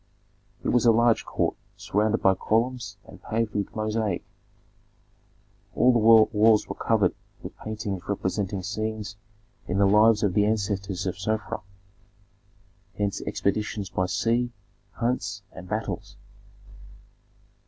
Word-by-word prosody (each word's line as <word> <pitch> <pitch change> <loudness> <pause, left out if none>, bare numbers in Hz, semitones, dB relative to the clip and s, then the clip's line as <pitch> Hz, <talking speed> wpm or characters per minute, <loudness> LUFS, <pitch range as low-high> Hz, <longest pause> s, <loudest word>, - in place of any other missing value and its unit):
It - - 0
was 125 -1 +3
a - - +8
large 115 0 +3
court - - -1 0.2
surrounded 110 +2 0
by 95 - +6
columns 115 +1 -1
and - - -14
paved 110 -1 -2
with 100 -1 -3
mosaic. 110 -3 -1 1.5
All 125 - +5
the 120 - +3
walls 110 -1 +5
were - - -4
covered 105 -5 +1 0.3
with - - -8
paintings 105 -3 -4
representing 100 -1 -2
scenes 110 0 -4 0.5
in 90 - -1
the 100 - +4
lives 105 +2 +5
of 100 -3 +2
the 105 +1 +3
ancestors 100 -3 -1
of 95 0 -3
Sofra; 110 +1 -2 1.4
hence 100 -1 -1
expeditions 100 -2 -2
by 95 - 0
sea, 120 +5 +1 0.4
hunts, 115 -4 -2
and 90 0 -11
battles. - - -4
105 Hz, 120 wpm, -26 LUFS, 100-110 Hz, 1.5 s, a